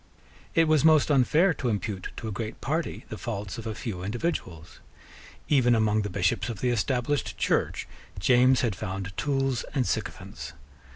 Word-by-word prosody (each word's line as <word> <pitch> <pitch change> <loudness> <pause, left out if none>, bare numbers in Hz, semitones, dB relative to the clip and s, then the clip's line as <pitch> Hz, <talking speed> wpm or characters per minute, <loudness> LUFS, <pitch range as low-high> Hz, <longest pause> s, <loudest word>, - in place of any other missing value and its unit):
It 165 -1 +5
was 155 -2 +4
most 155 -2 +5
unfair 150 +7 +4
to 130 -5 -2
impute 100 -3 -3
to 115 - -5
a - - -3
great 110 +2 -5
party 155 +5 -2
the - - -6
faults 105 -4 -4
of 115 - -6
a 110 - -3
few 100 -5 -5
individuals. 95 - -4 0.7
Even 125 -5 +4
among 110 -1 +2
the 105 - -3
Bishops 95 +4 0
of 110 -4 -5
the 125 - +1
Established 125 +5 0
Church - - 0 0.3
James 125 +6 +4
had 115 -6 0
found 95 +1 -5
tools 135 -3 0
and 130 -3 +2
sycophants. - - -4
120 Hz, 165 wpm, -27 LUFS, 100-135 Hz, 0.7 s, It